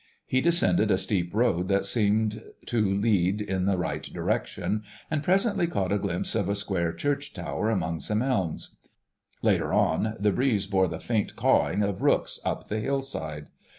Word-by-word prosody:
He 130 Hz, -, +1 dB
descended 110 Hz, -, +3 dB
a 95 Hz, -, +4 dB
steep 95 Hz, -2 st, -1 dB
road 105 Hz, -6 st, +1 dB
that 100 Hz, 0 st, +1 dB
seemed 110 Hz, 0 st, +1 dB, 0.2 s
to 120 Hz, -2 st, 0 dB
lead 100 Hz, -1 st, +2 dB
in 95 Hz, -3 st, -1 dB
the 100 Hz, -2 st, +2 dB
right 90 Hz, -, -2 dB
direction, 105 Hz, +1 st, -2 dB, 0.3 s
and 155 Hz, -2 st, 0 dB
presently 195 Hz, +2 st, +2 dB
caught 100 Hz, -, -1 dB
a 100 Hz, -, +2 dB
glimpse 95 Hz, -3 st, -2 dB
of 100 Hz, -4 st, 0 dB
a 100 Hz, -, +1 dB
square 95 Hz, -5 st, -1 dB
church 145 Hz, +6 st, -2 dB
tower 110 Hz, -, -2 dB
among 85 Hz, -6 st, -1 dB
some 105 Hz, +6 st, 0 dB
elms; 105 Hz, -11 st, -1 dB, 0.6 s
later -, -, +2 dB
on 110 Hz, 0 st, +2 dB
the 105 Hz, +1 st, +3 dB
breeze 110 Hz, -3 st, +1 dB
bore 95 Hz, -1 st, +2 dB
the 80 Hz, -1 st, -5 dB
faint 110 Hz, -3 st, -1 dB
cawing 105 Hz, +2 st, +2 dB
of 100 Hz, -2 st, -2 dB
rooks -, -, +2 dB
up -, -, -3 dB
the 110 Hz, -, -2 dB
hillside. 105 Hz, -, -3 dB
105 Hz, 170 wpm, -27 LUFS, 95-115 Hz, 0.6 s, a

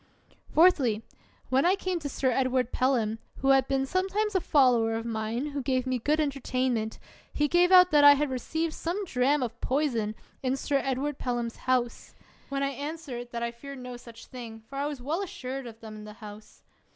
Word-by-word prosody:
Fourthly, 270 Hz, -, +4 dB, 0.5 s
when 265 Hz, +1 st, +3 dB
I 360 Hz, +2 st, +4 dB
came 370 Hz, -3 st, -2 dB
to 295 Hz, -3 st, -5 dB
Sir 260 Hz, -1 st, 0 dB
Edward 255 Hz, -1 st, +1 dB
Pelham, 230 Hz, -4 st, +1 dB, 0.2 s
who 270 Hz, -, +2 dB
had 270 Hz, -1 st, +5 dB
been 270 Hz, -1 st, +1 dB
sometimes 385 Hz, +6 st, 0 dB
a 375 Hz, -, +2 dB
follower 245 Hz, -7 st, +3 dB
of 225 Hz, 0 st, -4 dB
mine, 230 Hz, +5 st, -2 dB
who 285 Hz, 0 st, -3 dB
gave 255 Hz, 0 st, 0 dB
me 255 Hz, -1 st, -1 dB
good 300 Hz, +6 st, +1 dB
entertainment, 255 Hz, -6 st, -1 dB, 0.3 s
he 295 Hz, -, +1 dB
gave 350 Hz, +4 st, +3 dB
out 365 Hz, -1 st, +8 dB
that 295 Hz, -1 st, +5 dB
I 285 Hz, 0 st, +10 dB
had 290 Hz, -1 st, -1 dB
received 320 Hz, +6 st, -2 dB
some 370 Hz, +5 st, -3 dB
dram 270 Hz, -1 st, +1 dB
of 235 Hz, -1 st, -5 dB
poison 245 Hz, -6 st, 0 dB, 0.3 s
in 260 Hz, 0 st, 0 dB
Sir 280 Hz, +1 st, 0 dB
Ed 270 Hz, -1 st, -1 dB
ward 290 Hz, +1 st, -3 dB
Pelham 240 Hz, -2 st, -2 dB
's -, -, -20 dB
house; 245 Hz, -2 st, 0 dB, 0.3 s
when 275 Hz, 0 st, -1 dB
I 275 Hz, -, +1 dB
answered 280 Hz, -3 st, -6 dB
that 235 Hz, 0 st, -4 dB
I 235 Hz, -, -1 dB
feared 275 Hz, +4 st, -10 dB
no 250 Hz, -1 st, -7 dB
such 235 Hz, -1 st, -12 dB
thing— 230 Hz, -3 st, -9 dB
for 275 Hz, -, -8 dB
I 285 Hz, +1 st, 0 dB
was 285 Hz, -4 st, -6 dB
well 315 Hz, +8 st, -1 dB
assured 265 Hz, -8 st, -5 dB
of 225 Hz, -1 st, -12 dB
them 215 Hz, -1 st, -9 dB
in 210 Hz, -, -10 dB
the 210 Hz, -, -9 dB
house. 210 Hz, -1 st, -12 dB
260 Hz, 205 wpm, -28 LUFS, 235-295 Hz, 0.5 s, I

